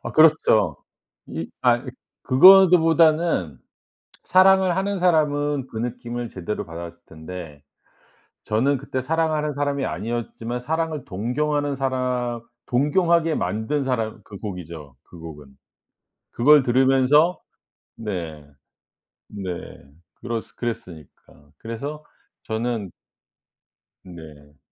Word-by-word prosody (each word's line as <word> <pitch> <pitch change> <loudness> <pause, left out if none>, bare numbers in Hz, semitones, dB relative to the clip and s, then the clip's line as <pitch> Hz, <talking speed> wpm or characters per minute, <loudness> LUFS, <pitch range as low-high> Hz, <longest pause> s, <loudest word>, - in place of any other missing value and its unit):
아 - - -6
그렇죠. 145 - +4 0.5
이 80 0 -6
아이 120 -1 +3 0.4
그거보다는 165 - +5 0.6
사랑을 185 0 +4
하는 195 +1 -1
사람은 145 -5 +1
그 110 - -7
느낌을 120 0 -4
제대로 105 +3 -5
받았을 85 +1 -9
텐데 80 -2 -10 0.8
저는 130 +7 +1
그때 130 +1 -4
사랑하는 155 0 -1
사람이 140 -1 -1
아니었지만 120 +2 -4
사랑을 160 +2 -3
동경하는 145 +8 -2
사람 125 -3 -2 0.3
동경하게 165 +5 +2
만든 110 +7 -2
사람 115 -4 -2
그 100 - -11
곡이죠, 85 - -8
그 85 - -15
곡은. 75 -4 -11 0.8
그걸 145 +4 +5
들으면서 135 +6 +3 0.6
네 85 -9 -6 0.9
네 95 -3 -5 0.7
그렀 115 -2 -3
그랬으니까 90 - -8
그래서 140 +7 -7 0.4
저는 110 -3 -3 1.1
네. 75 -5 -14
125 Hz, 225 characters per minute, -23 LUFS, 95-150 Hz, 1.1 s, 그거보다는